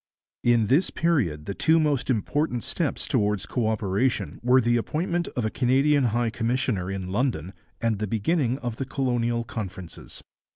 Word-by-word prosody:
In 120 -2 +4
this 140 - +3
period 110 - 0
the 100 - -3
two 160 +10 +3
most 145 -4 +1
important 125 +2 0
steps 165 -6 -2
towards 105 -5 +1
co 115 +1 -1
operation 110 +3 0
were 125 +2 +5
the 120 -1 +2
appointment 170 +8 -1
of 120 - -1
a 110 - -1
Canadian 135 +2 +3
High 120 0 +1
Commissioner 115 -5 -1
in 95 -2 -4
London 100 - -1 0.3
and 115 -3 0
the 105 - -1
beginning 120 - 0
of 120 -2 -3
the 135 - -3
Colonial 120 -3 0
Conferences. 95 -6 -7
120 Hz, 160 wpm, -25 LUFS, 105-135 Hz, 0.3 s, were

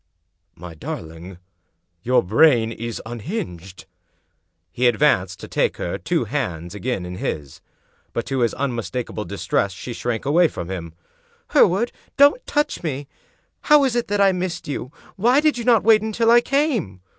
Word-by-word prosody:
"My 90 0 -10
darling, 80 +3 -8 0.6
your 125 +4 +2
brain 115 - +4
is 115 0 -5
unhinged 100 - -6
1" - - -45 0.8
He 125 +1 +2
advanced 95 - +2
to - - -8
take - - 0
her - - -4
two - - 0
hands 85 +1 -3
again 105 -3 -3
in 90 0 -7
his; 70 -7 -5 0.5
but, 115 - -3
to 135 -1 -2
his 120 -2 +1
unmistakable 120 -4 -3
distress, 100 -1 -1
she 120 +6 -7
shrank 120 0 -3
away 165 +5 +4
from 85 - -7
him. 85 -3 -6 0.3
" - - -37
Hereward 205 +7 +4 0.2
— - - -37
don't 285 - +5
touch 295 0 0
me. 145 -4 -4 0.6
How 300 -2 +6
is 260 -3 +1
it 240 - 0
that 205 0 -1
I 195 -1 +5
missed 180 -1 -4
you? 140 -3 -5 0.3
Why 240 +8 +4
did 300 -4 +2
you 235 - -5
not 235 -4 +4
wait 220 0 +5
until 225 +1 +1
I 240 0 +7
came?" 245 - -1
125 Hz, 170 wpm, -22 LUFS, -, 0.8 s, I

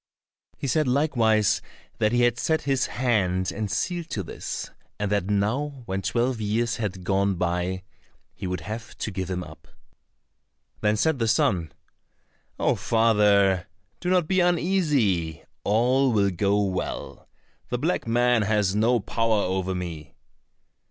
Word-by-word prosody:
He - - -5
said 150 +2 +1
likewise 120 -6 +2 0.4
that 105 - +2
he 120 0 +2
had 120 0 +2
set 160 -1 0
his 135 -3 +1
hand 95 -7 0
and 110 -2 -3
seal 170 - -1
to 105 -10 -4
this, 80 - -6 0.3
and 105 -1 -2
that 100 -3 +1
now 125 +7 -1
when 95 -1 -2
twelve 120 +5 0
years 115 +3 0
had 95 -4 -4
gone 100 +1 +1
by 90 +1 -1 0.5
he 95 - -6
would 90 -1 -3
have 110 +6 -7
to 110 - -3
give 95 -1 -4
him 90 -1 -2
up. 75 -1 -13 1.1
Then 105 0 +1
said 145 +4 +1
the 115 - +1
son, 95 -7 +1 0.9
"Oh, - - +2
father, 105 -4 +3 0.3
do 180 - -2
not 180 -3 +3
be 190 +1 +2
uneasy, 150 - +1 0.2
all 125 +5 +3
will 100 -3 +2
go 100 +3 +1
well. 95 -2 -4 0.4
The 125 - -1
black 155 0 -1
man 120 0 +3
has 105 -2 +1
no 115 +3 +3
power 110 0 0
over 95 0 -1
me." 85 -5 -6
105 Hz, 145 wpm, -25 LUFS, 95-125 Hz, 1.1 s, father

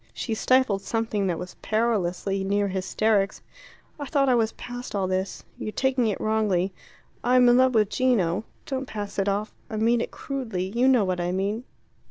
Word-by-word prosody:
She 230 - -3
stifled 240 -3 +2
something 220 -2 -1
that 175 -2 0
was 180 +2 -8
perilously 200 -3 0
near 200 +1 +1
hysterics. 195 +2 0 0.6
"I 285 - -4
thought 275 -1 +2
I - - +5
was 225 -2 +2
past 245 -2 -7
all 195 -2 +1
this. 185 +1 -2 0.2
You're 215 - -4
taking 260 0 +1
it 210 - -1
wrongly. 205 -4 +1 0.5
I'm 250 0 +5
in 240 0 +6
love 255 -1 +4
with 210 -2 +4
Gino 205 -5 +1 0.2
don't 265 -1 -3
pass 205 -1 -5
it 195 +1 +1
off 205 +2 -2 0.2
I 220 - -5
mean 230 +2 +2
it - - -3
crudely 245 -10 -4
you 250 +2 +4
know 250 -6 +5
what 180 -1 -1
I 175 0 -1
mean. 200 +6 -2
215 Hz, 185 wpm, -25 LUFS, 195-245 Hz, 0.6 s, in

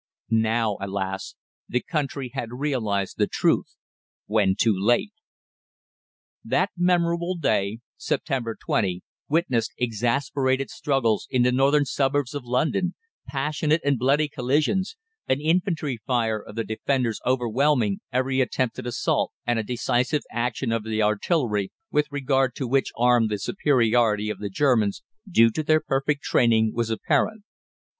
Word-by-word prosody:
Now, 110 -1 +1
alas! 95 -1 -4 0.3
the 125 - +1
country 140 -4 -3
had 120 0 -4
realised 115 -8 -2
the - - +3
truth - - 0 0.5
when 105 -3 +2
too 110 0 +3
late. 120 - +1 1.3
That - - +1
memorable 175 0 +1
day, 110 -8 0 0.2
September 130 -8 -2
20, 90 -3 -1 0.3
witnessed 140 -8 +1
exasperated 130 +3 0
struggles 130 -7 0
in 125 -1 +2
the 125 - +3
northern 140 +3 +3
suburbs 140 -1 0
of 145 -4 -5
London, 155 +9 0 0.3
passionate 150 +3 0
and 140 -3 +2
bloody 140 +5 +2
collisions, 150 - 0 0.3
an 130 - +1
infantry 155 - 0
fire 115 -4 0
of 105 - -12
the 115 - -1
defenders 115 +1 -1
overwhelming 125 -3 +1
every 130 +1 +1
attempted 125 -1 -1
assault; 120 - 0
and 120 -1 +1
a - - -1
decisive 125 +5 0
action 120 +1 -1
of 115 -1 -1
the 110 0 -1
artillery, 105 - 0 0.2
with 150 0 +2
regard 135 -2 +1
to 130 - -3
which 135 +2 +1
arm 120 -1 +4
the 105 -1 -2
superiority 115 - +2
of - - -7
the 105 - -4
Germans, 110 -3 +1 0.3
due 115 -10 +5
to 155 - -2
their 155 +1 +3
perfect 140 -1 -1
training, 110 -2 +3
was 115 -1 -1
apparent. 155 - 0
125 Hz, 135 wpm, -24 LUFS, 110-145 Hz, 1.3 s, due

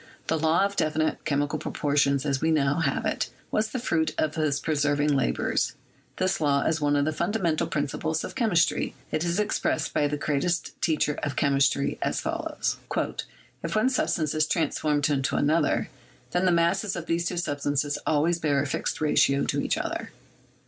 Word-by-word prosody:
The 160 - 0
law 160 +5 +3
of 200 0 -3
definite 155 -1 0
chemi 145 0 +1
cal - - -3
proportions, 140 -1 +1
as 140 -2 0
we 160 - +2
now 145 -1 +2
have 140 -5 0
it, - - -1 0.2
was 215 0 +1
the 260 - -3
fruit 160 -10 0
of 155 -1 0
his 155 -3 0
persevering 145 -1 +1
labors. 135 -3 0 0.4
This 185 -2 0
law 140 -2 +2
is 160 -1 0
one 145 0 +2
of 145 0 +2
the 155 - +1
fundamental 170 -1 0
principles 155 +2 -2
of - - -6
chemistry. 210 -9 +1 0.2
It 155 - 0
is 175 +3 0
expressed 210 0 0
by 145 - +2
the 150 +1 -2
greatest 155 +4 -1
teacher 150 -2 +1
cf 145 - -2
chemistry 140 -1 +2
as - - 0
follows: - - -2 0.9
"If 165 0 -3
one 215 +4 +3
substance 160 - 0
is 155 -1 +2
transformed 150 -3 +1
into 140 -3 0
another, 150 +1 +2 0.4
then 180 +1 +1
the 185 - +4
masses 175 +4 +1
of 175 -2 -5
these 170 +1 0
two 180 - -3
substances 145 -2 -1
always 160 +3 +2
bear 145 -3 +1
a - - -3
fixed 140 - -2
ratio 140 -2 +3
to - - 0
each - - 0
other. - - -3
155 Hz, 180 wpm, -26 LUFS, 145-170 Hz, 0.9 s, the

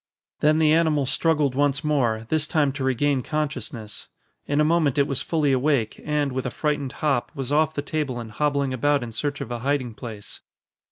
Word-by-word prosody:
Then 155 +1 +4
the 155 -1 +4
animal 160 -4 +3
struggled 150 -1 +2
once 140 +2 +1
more, 120 -7 +1
this 155 -1 +1
time 150 -4 +2
to 135 0 -5
regain 135 +1 +1
consciousness. 140 -7 -4 0.4
In 145 +1 +1
a - - +5
moment 155 -4 +2
it 140 - +4
was 135 -2 -2
fully 155 -4 +1
awake 130 -3 +1
and, 150 -2 0
with 130 0 -2
a - - -1
frightened 145 0 -2
hop, 135 -5 +1
was 135 -1 -4
off 155 +1 +2
the 145 - -2
table 145 -5 -2
and 115 -2 -7
hobbling 140 -1 0
about 140 +2 +1
in 120 - -6
search 145 +6 -3
of 120 - -5
a 120 - -3
hiding 130 -2 -1
place. 110 -3 -9
145 Hz, 200 wpm, -24 LUFS, 130-150 Hz, 0.4 s, a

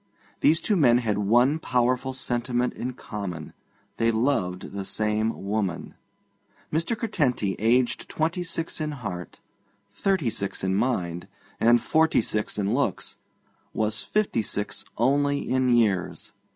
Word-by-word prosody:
These 160 +2 +4
two 210 - +1
men 125 -9 +5
had 110 -4 0
one 120 +9 +3
powerful 125 0 +1
sentiment 125 -1 -1
in 125 +1 -4
common: 100 -9 -6 0.4
they 115 - +2
loved 110 -6 0
the 100 0 -4
same 105 +2 -1
woman. 100 -4 -2 0.8
Mr. 170 +9 0
Curtenty, 130 - 0
aged 120 +3 +2
twenty 165 +3 -1
six 165 -1 -3
in 155 -1 -2
heart, 90 -10 -7 0.5
thirty 155 - 0
six 100 -2 -3
in 95 0 +1
mind, 90 -6 -1 0.3
and 120 +1 +5
forty 160 -1 +3
six 105 -1 -2
in 100 +1 0
looks, 125 -7 -1 0.6
was 110 -1 0
fifty 210 - 0
six 105 -1 -3
only 140 +4 +2
in 130 0 +2
years. 110 -7 +1
120 Hz, 130 wpm, -26 LUFS, 105-140 Hz, 0.8 s, men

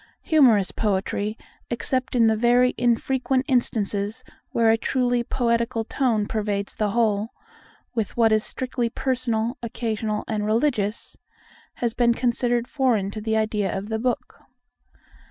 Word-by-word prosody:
Humorous 245 - +4
poetry, 205 +1 -1 0.3
except 255 +2 -1
in 235 -2 +5
the 220 0 +4
very 245 +2 +3
infrequent 255 +2 +1
instances 220 -3 -1 0.3
where 225 -1 +3
a - - +5
truly 245 +1 0
poetical 235 -1 0
tone 230 -3 0
pervades 205 -2 -2
the 210 -1 -1
whole, 215 -1 +1 0.6
with 225 -3 -3
what 225 -2 +4
is 215 0 +3
strictly 250 -2 -2
personal, 245 -1 -1
occasional, 220 -2 -3
and 215 -2 -2
religious, 215 -1 -1 0.6
has 235 -2 -1
been 235 -1 +3
considered 240 -1 0
foreign 245 -9 +1
to 215 - -6
the 220 0 0
idea 210 -3 0
of 200 +2 -6
the 220 0 -1
book. 245 +1 -3
230 Hz, 135 wpm, -24 LUFS, 215-245 Hz, 0.6 s, in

